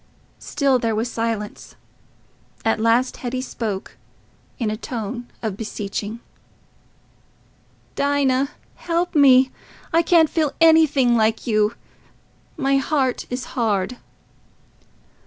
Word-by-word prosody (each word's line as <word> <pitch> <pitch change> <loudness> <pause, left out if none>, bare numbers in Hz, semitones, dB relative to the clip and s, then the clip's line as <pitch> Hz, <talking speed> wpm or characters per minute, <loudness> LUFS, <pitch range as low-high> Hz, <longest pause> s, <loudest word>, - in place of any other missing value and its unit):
Still 275 -3 +1
there 225 -2 0
was 230 +3 -2
silence. 225 -2 -4 0.9
At 225 0 +2
last 230 +3 +2
Hetty 255 +1 -3
spoke, 215 -6 -5 0.6
in 225 -4 -1
a - - -2
tone 235 +1 -5 0.2
of 215 -4 -2
beseeching— 210 +1 -5 1.7
"Dinah... 280 -1 +1 0.3
help 345 +1 -1
me... 265 -3 +6 0.4
I 330 - +5
can't 335 -1 +4
feel 305 -2 0
anything 310 -7 +5
like 220 0 +1
you...my 235 +5 -3
heart 270 -2 0
is 250 +1 -3
hard." 225 -1 0
250 Hz, 100 wpm, -22 LUFS, 225-280 Hz, 1.7 s, me